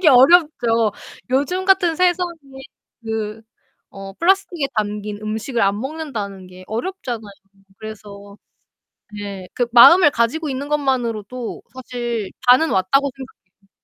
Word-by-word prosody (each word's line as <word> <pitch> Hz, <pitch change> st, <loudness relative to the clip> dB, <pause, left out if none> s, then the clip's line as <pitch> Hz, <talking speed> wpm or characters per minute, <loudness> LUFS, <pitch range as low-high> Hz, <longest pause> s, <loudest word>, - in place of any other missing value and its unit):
하기 350 Hz, -, +5 dB
어렵죠. 255 Hz, -, +4 dB, 0.4 s
요즘 290 Hz, +9 st, 0 dB
같은 365 Hz, -4 st, +3 dB
세상에 360 Hz, 0 st, +1 dB, 0.7 s
그 220 Hz, 0 st, -4 dB, 0.5 s
어 195 Hz, 0 st, -9 dB
플라스틱에 350 Hz, -, +1 dB
담긴 210 Hz, 0 st, -3 dB
음식을 220 Hz, +3 st, -3 dB
안 200 Hz, +1 st, +1 dB
먹는다는 235 Hz, -10 st, -6 dB
게 185 Hz, 0 st, -14 dB
어렵잖아요. 235 Hz, -, -5 dB, 0.5 s
그래서 205 Hz, -2 st, -10 dB, 0.8 s
네. 200 Hz, -2 st, -7 dB
'그 245 Hz, -, 0 dB
마음을 295 Hz, +7 st, +8 dB
가지고 290 Hz, +6 st, -1 dB
있는 270 Hz, +1 st, -4 dB
것만으로도 250 Hz, -5 st, -2 dB
사실 240 Hz, -5 st, -4 dB, 0.2 s
반은 315 Hz, +6 st, +6 dB
왔다.'고 200 Hz, +10 st, +2 dB
생각해요. 195 Hz, -7 st, -15 dB
240 Hz, 280 characters per minute, -20 LUFS, 210-295 Hz, 0.8 s, 마음을